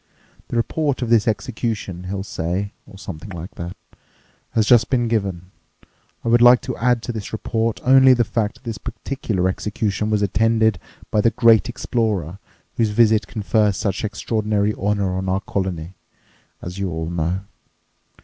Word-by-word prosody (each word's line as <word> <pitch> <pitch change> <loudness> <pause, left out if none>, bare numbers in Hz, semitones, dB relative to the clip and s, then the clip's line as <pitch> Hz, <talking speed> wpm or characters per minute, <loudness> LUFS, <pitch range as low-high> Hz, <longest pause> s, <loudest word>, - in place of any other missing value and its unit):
'The - - -5
report 140 +3 0
of 115 - -3
the 115 -3 +5
execution,' 110 -5 -3
he'll 95 +1 -3
say, 95 +1 -3
or 100 -2 -13
something 85 -1 -8
like 85 0 -8
that, 85 +3 -7 0.8
'has 110 - +3
just 120 -1 +5
been 120 -3 +1
given. 95 -5 -2 0.7
I - - -4
would 120 +1 +4
like 120 0 +8
to 130 - -4
add 120 -1 +1
to - - -3
this 110 -3 -6
report 115 0 -1
only 130 0 +7
the 120 - +3
fact 110 -2 -1
that - - -21
this 115 -3 -5
particular 110 -9 -2
execution 105 +2 -2
was 105 -1 +1
attended 110 0 +2 0.3
by 105 - +3
the 115 - +4
great 115 -2 +4
explorer 105 - -2 0.4
whose 115 -2 +2
visit 110 0 +3
confers 105 -2 +1
such 95 -1 -2
extraordinary 105 0 0
honour 100 -2 -1
on 95 0 -2
our 95 +1 0
colony, 95 -3 -3 0.7
as 90 +2 -6
you 100 -1 -1
all 80 0 -4
know. 85 +2 -1
105 Hz, 160 wpm, -21 LUFS, 95-115 Hz, 0.8 s, like